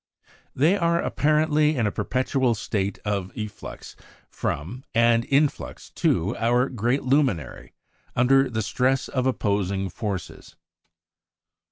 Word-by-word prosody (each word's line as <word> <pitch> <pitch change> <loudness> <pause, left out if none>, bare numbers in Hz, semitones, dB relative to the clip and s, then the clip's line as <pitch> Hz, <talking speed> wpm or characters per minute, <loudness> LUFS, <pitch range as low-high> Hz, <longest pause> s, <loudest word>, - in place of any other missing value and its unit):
They 155 +9 +4
are 170 -2 +2
apparently 155 +1 +2
in 120 -4 +1
a 105 - +1
perpetual 130 +3 0
state 100 -1 -2
of 100 -3 -2
efflux 105 -1 -7 0.4
from, 90 - -4
and 115 0 +4
influx 140 +1 -1
to 90 +5 0
our 120 +3 +2
great 120 +3 0
luminary, 130 - 0 0.4
under 135 +2 +4
the 110 -2 -2
stress 130 +5 +1
of 130 -1 -1
opposing 100 -5 -1
forces. 100 -7 -6
120 Hz, 115 wpm, -24 LUFS, 105-135 Hz, 0.4 s, They